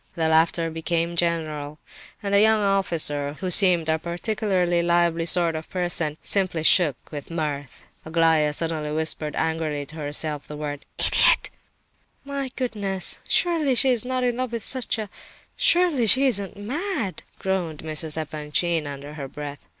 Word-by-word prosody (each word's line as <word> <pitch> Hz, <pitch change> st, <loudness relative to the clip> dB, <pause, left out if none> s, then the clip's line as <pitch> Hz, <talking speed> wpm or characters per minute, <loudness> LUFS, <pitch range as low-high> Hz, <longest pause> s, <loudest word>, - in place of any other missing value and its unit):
The 160 Hz, -1 st, 0 dB
laughter 165 Hz, +1 st, +2 dB
became 165 Hz, +1 st, -2 dB
general, 155 Hz, -3 st, -2 dB, 0.5 s
and 200 Hz, 0 st, -2 dB
the 200 Hz, -, +6 dB
young 220 Hz, 0 st, +5 dB
officer, 165 Hz, -8 st, 0 dB
who 185 Hz, -1 st, -3 dB
seemed 175 Hz, -3 st, +5 dB
a 160 Hz, 0 st, +1 dB
particularly 175 Hz, 0 st, -1 dB
lively 170 Hz, -1 st, +1 dB
sort 170 Hz, -1 st, +3 dB
of 155 Hz, 0 st, -6 dB
person, 175 Hz, -4 st, -1 dB
simply 185 Hz, -5 st, +1 dB
shook 160 Hz, -4 st, +5 dB, 0.2 s
with 145 Hz, -2 st, -7 dB
mirth. 150 Hz, -5 st, -4 dB, 0.2 s
Aglaya 160 Hz, -2 st, +2 dB
suddenly 155 Hz, -1 st, -3 dB
whispered 155 Hz, -1 st, -1 dB
angrily 160 Hz, -3 st, -2 dB
to 155 Hz, +3 st, -11 dB
herself 150 Hz, 0 st, -3 dB
the 150 Hz, -, -8 dB
word— 145 Hz, -1 st, -6 dB
"Idiot!" -, -, +3 dB, 0.7 s
"My 280 Hz, -1 st, -4 dB
goodness—surely 250 Hz, -, +1 dB
she 260 Hz, +2 st, +5 dB
is 240 Hz, -4 st, 0 dB
not 255 Hz, 0 st, -2 dB
in 245 Hz, -1 st, 0 dB
love 255 Hz, -2 st, -3 dB
with 230 Hz, -3 st, -3 dB
such 260 Hz, -3 st, 0 dB
a—surely 270 Hz, -, 0 dB
she 260 Hz, +7 st, +6 dB
isn't 205 Hz, -6 st, -1 dB
mad!" 245 Hz, -, -3 dB, 0.2 s
groaned 180 Hz, -6 st, -3 dB
Mrs. 155 Hz, 0 st, -3 dB
Epanchin, 155 Hz, +1 st, -2 dB
under 140 Hz, +1 st, -8 dB
her 140 Hz, -3 st, -6 dB
breath. 145 Hz, +1 st, -8 dB
170 Hz, 145 wpm, -24 LUFS, 155-200 Hz, 0.7 s, the